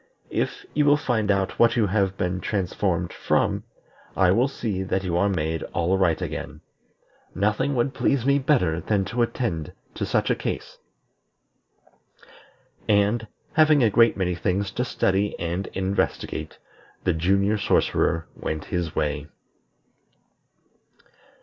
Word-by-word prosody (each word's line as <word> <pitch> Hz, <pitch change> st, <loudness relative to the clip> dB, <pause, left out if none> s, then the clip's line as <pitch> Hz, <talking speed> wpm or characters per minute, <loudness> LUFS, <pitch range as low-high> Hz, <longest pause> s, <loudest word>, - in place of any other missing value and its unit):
If 410 Hz, 0 st, -2 dB
you 150 Hz, -, +2 dB
will 145 Hz, 0 st, +5 dB
find 115 Hz, -7 st, -1 dB
out 95 Hz, -1 st, 0 dB
what 115 Hz, 0 st, +5 dB
you 115 Hz, -3 st, +3 dB
have 95 Hz, -1 st, 0 dB
been 90 Hz, 0 st, -1 dB
transformed 90 Hz, -3 st, -1 dB
from, -, -, 0 dB, 0.5 s
I 95 Hz, -2 st, +5 dB
will 120 Hz, +7 st, +3 dB
see 110 Hz, -8 st, -3 dB
that 95 Hz, 0 st, -1 dB
you 90 Hz, -2 st, -1 dB
are 100 Hz, +4 st, +2 dB
made 80 Hz, -3 st, -1 dB
all 85 Hz, +3 st, +2 dB
right 90 Hz, -4 st, +2 dB
again. 75 Hz, +1 st, -5 dB, 0.7 s
Nothing 110 Hz, +8 st, +1 dB
would 125 Hz, +3 st, 0 dB
please 135 Hz, -4 st, +1 dB
me 140 Hz, +1 st, +4 dB
better 105 Hz, -, +2 dB
than 100 Hz, +3 st, 0 dB
to 120 Hz, +4 st, -2 dB
attend 115 Hz, -, -2 dB, 0.2 s
to -, -, -3 dB
such -, -, +1 dB
a -, -, +2 dB
case." -, -, -5 dB, 2.1 s
And, 105 Hz, +2 st, +2 dB, 0.3 s
having 155 Hz, -3 st, +5 dB
a 110 Hz, -, +4 dB
great 115 Hz, +2 st, +4 dB
many 90 Hz, -2 st, 0 dB
things 95 Hz, +2 st, -1 dB
to 125 Hz, -, -2 dB
study 100 Hz, -4 st, 0 dB
and 85 Hz, +3 st, -2 dB
investigate, 95 Hz, +1 st, -2 dB, 0.5 s
the -, -, +2 dB
Junior 100 Hz, +5 st, +2 dB
Sorcerer 85 Hz, -3 st, +1 dB
went 80 Hz, -1 st, -4 dB
his 85 Hz, -3 st, -2 dB
way. 75 Hz, 0 st, -1 dB
100 Hz, 135 wpm, -24 LUFS, 90-115 Hz, 2.1 s, will